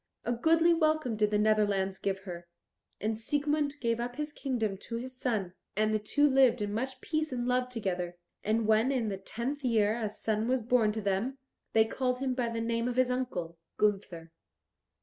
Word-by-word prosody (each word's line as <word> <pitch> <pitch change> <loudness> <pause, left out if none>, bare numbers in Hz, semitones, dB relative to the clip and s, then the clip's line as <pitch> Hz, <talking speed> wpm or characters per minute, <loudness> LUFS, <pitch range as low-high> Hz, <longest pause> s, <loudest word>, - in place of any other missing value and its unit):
A 240 - +1
goodly 330 +7 +4
welcome 310 -7 +1
did 210 -1 +2
the 210 - +2
Netherlands 205 -3 +2
give 195 -1 -2
her. 175 -3 -8 0.5
And 220 +2 -1
Siegmund 290 +5 0
gave 230 -2 0
up 245 +1 -3
his 300 0 -4
kingdom 235 -9 -1
to 230 - -7
his 255 +2 -5
son, 215 -8 -1 0.2
and 215 0 +2
the 215 - +2
two 290 +8 +3
lived 260 -3 +4
in 205 -1 -2
much 260 +4 -3
peace 310 -1 -1
and 245 -1 -2
love 250 0 +1
together; 180 -7 -3 0.3
and 220 +1 +1
when 220 +4 +3
in 240 -5 0
the 195 - -3
tenth 245 +8 -4
year 220 -3 +3
a 225 -3 -2
son 215 +1 -1
was 255 -1 +1
born 230 -2 +3
to 220 - -3
them, 200 +7 -1 0.4
they 220 0 +5
called 250 +2 -1
him 260 0 -1
by 245 -2 -1
the 230 0 -3
name 230 +1 0
of 245 - -2
his 255 0 +3
uncle 180 -10 -3 0.2
Gunther. 190 -6 0
230 Hz, 195 wpm, -30 LUFS, 210-255 Hz, 0.5 s, they